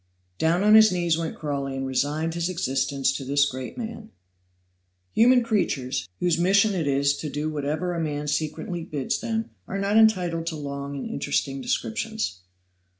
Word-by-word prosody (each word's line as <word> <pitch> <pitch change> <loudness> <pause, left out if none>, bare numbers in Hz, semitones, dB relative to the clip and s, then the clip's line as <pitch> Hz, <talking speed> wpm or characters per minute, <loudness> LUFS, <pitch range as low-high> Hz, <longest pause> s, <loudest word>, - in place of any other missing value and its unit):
Down 170 +4 +2
on 210 +1 +6
his 220 -1 +8
knees 175 -2 +1
went 165 0 -3
Crawley 140 -3 -3
and 135 - -2
resigned 150 +5 -1
his 170 +1 -1
existence 135 -4 0
to 135 - -4
this 140 +2 +3
great 130 - -5
man. 225 -2 -6 1.0
Human 245 +2 +5
creatures, 135 - -1
whose 175 -2 +1
mission 200 +4 +4
it 165 -6 -1
is 140 0 +2
to 155 - -4
do 150 +2 -3
whatever 155 +4 -2
a 170 - -2
man 150 -2 -3
secretly 160 +3 -2
bids 145 -4 -2
them, 225 -1 -2 0.2
are 195 - -3
not 200 +2 +1
entitled 180 -7 +3
to 165 - -2
long 140 -1 -5
and 135 - -4
interesting 140 -1 -2
descriptions. 125 - -2
160 Hz, 165 wpm, -25 LUFS, 140-185 Hz, 1.0 s, his